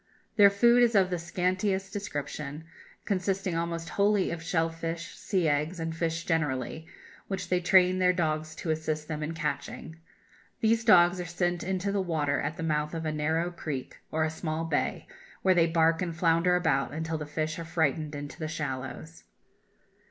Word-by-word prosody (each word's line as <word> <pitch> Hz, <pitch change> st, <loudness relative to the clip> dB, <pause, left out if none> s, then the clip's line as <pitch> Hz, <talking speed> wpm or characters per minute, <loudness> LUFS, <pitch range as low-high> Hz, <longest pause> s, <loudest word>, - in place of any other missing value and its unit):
Their 205 Hz, -2 st, +8 dB
food 235 Hz, +5 st, +5 dB
is 235 Hz, -2 st, +4 dB
of 190 Hz, -2 st, +4 dB
the 180 Hz, -, -1 dB
scantiest 190 Hz, +3 st, -1 dB
description, 150 Hz, -5 st, -5 dB, 0.4 s
consisting 190 Hz, -1 st, -1 dB
almost 170 Hz, 0 st, -2 dB
wholly 205 Hz, -1 st, +2 dB
of 170 Hz, -1 st, -4 dB
shell 165 Hz, -1 st, 0 dB
fish, 165 Hz, +1 st, -5 dB
sea 185 Hz, -6 st, 0 dB
eggs, 155 Hz, +4 st, 0 dB
and 165 Hz, 0 st, -3 dB
fish 165 Hz, 0 st, -2 dB
generally, 155 Hz, -1 st, -1 dB, 0.4 s
which 195 Hz, -, -4 dB
they 180 Hz, -, +2 dB
train 185 Hz, +1 st, +4 dB
their 180 Hz, 0 st, +5 dB
dogs 155 Hz, -3 st, -1 dB
to 160 Hz, -, -3 dB
assist 155 Hz, -1 st, -2 dB
them 155 Hz, -1 st, -4 dB
in 155 Hz, +2 st, -3 dB
catching. 160 Hz, +1 st, -4 dB, 0.6 s
These 225 Hz, 0 st, +2 dB
dogs 180 Hz, -3 st, +6 dB
are -, -, -5 dB
sent 175 Hz, 0 st, -1 dB
into 190 Hz, +2 st, -1 dB
the 200 Hz, -1 st, +1 dB
water 150 Hz, -6 st, 0 dB
at 150 Hz, +3 st, -3 dB
the 165 Hz, -, -4 dB
mouth 150 Hz, 0 st, -1 dB
of 165 Hz, 0 st, -4 dB
a 155 Hz, -, 0 dB
narrow 160 Hz, +3 st, 0 dB
creek 150 Hz, -6 st, -6 dB
or 160 Hz, 0 st, +1 dB
a 155 Hz, -, 0 dB
small 160 Hz, 0 st, -3 dB
bay, 165 Hz, -3 st, -1 dB, 0.4 s
where 190 Hz, -, +5 dB
they 170 Hz, -2 st, +4 dB
bark 165 Hz, 0 st, +3 dB
and 170 Hz, -3 st, -3 dB
flounder 170 Hz, +1 st, +3 dB
about 160 Hz, -8 st, +1 dB
until 160 Hz, 0 st, -2 dB
the 150 Hz, -, -5 dB
fish 155 Hz, +2 st, -2 dB
are -, -, -4 dB
frightened 160 Hz, -2 st, 0 dB
into 145 Hz, +3 st, -7 dB
the 155 Hz, -, -3 dB
shallows. 130 Hz, -, -5 dB
165 Hz, 180 wpm, -28 LUFS, 155-180 Hz, 0.6 s, Their